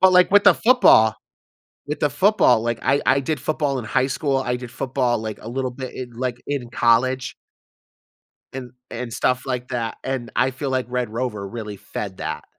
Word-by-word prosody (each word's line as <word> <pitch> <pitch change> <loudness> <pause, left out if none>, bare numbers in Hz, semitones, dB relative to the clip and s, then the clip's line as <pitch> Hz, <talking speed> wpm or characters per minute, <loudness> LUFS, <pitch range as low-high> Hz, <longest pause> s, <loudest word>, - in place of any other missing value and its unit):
But 190 0 +6
like 180 0 +5
with 205 +1 +5
the - - +8
football 225 - +5 0.7
with 150 - -4
the 150 - +3
football, 190 - +4
like, 115 0 -1
I 140 +2 +2
I 135 +1 +4
did 150 +2 -2
football 145 -1 -1
in 115 - -7
high 130 +4 +1
school, 135 0 -1
I 125 -2 -1
did 125 -1 -8
football 125 -1 -1
like 110 -1 -6
a 110 - -8
little 130 0 -2
bit 130 0 -7
in, 125 -2 -6
like, 120 +1 -3
in 135 -4 -3
college 125 +3 +1 1.2
and 125 -2 -7 0.2
and 120 -1 -5
stuff 125 +4 0
like 125 -2 -3
that, 115 -2 -3
and 130 -3 -4
I 130 +1 +2
feel 135 +1 -4
like 130 -2 -1
Red 125 -2 -2
Rover 110 -4 -3
really 105 -1 -7
fed 95 0 -6
that. 80 -2 -5
125 Hz, 195 wpm, -22 LUFS, 120-135 Hz, 1.2 s, the